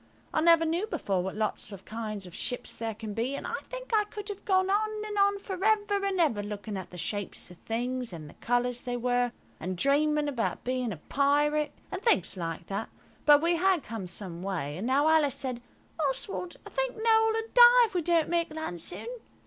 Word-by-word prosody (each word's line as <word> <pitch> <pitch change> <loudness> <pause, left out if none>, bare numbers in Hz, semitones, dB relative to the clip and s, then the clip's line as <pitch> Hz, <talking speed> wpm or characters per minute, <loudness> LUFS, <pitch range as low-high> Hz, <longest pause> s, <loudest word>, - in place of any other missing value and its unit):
I 310 - +2
never 335 0 +6
knew 340 +6 0
before 200 - -1
what 190 +2 -4
lots 215 -1 -2
of 195 -1 -10
kinds 215 -3 -5
of 180 - -11
ships 245 - -2
there 225 -1 -4
can 215 -1 -6
be, 240 +6 -1
and - - -6
I 475 - -3
think - - -8
I 425 -1 +4
could 415 0 -8
have 405 -1 -6
gone 375 -2 +3
on 430 +2 +2 0.2
and 420 -1 -5
on 400 0 +3
for 380 -1 -6
ever 415 -2 +2
and 390 -2 0
ever 285 -11 +2
looking 205 0 -5
at 190 -2 -6
the 180 - -10
shapes 195 +1 -3
of 180 - -13
things 245 +1 -2
and 160 -3 -8
the - - -13
colours 245 +1 0
they 245 -1 -2
were, 245 0 +1 0.3
and 185 +2 -4
dreaming 295 - +2
about 255 -6 -2
being 255 -2 -1
a 180 - -5
pirate, 295 - +1 0.2
and 380 0 -4
things 455 - +2
like 165 -2 -4
that, 200 +4 -4 0.4
but 295 +1 +7
we 340 0 +3
had 370 -2 +2
come 215 -4 -6
some 175 -1 -5
way; 175 -7 -3
and 210 +6 -3
now 280 +4 +3
Alice 310 -4 +4
said– 255 -3 -2 0.4
"Oswald, 320 +5 -1
I - - -10
think - - -1
Noël 445 0 +3
will 450 0 -2
die 485 0 +9
if 435 - -8
we 355 - +1
don't 335 -1 +2
make 340 -1 0
land 305 - -5
soon." - - -4
280 Hz, 215 wpm, -29 LUFS, -, 0.4 s, die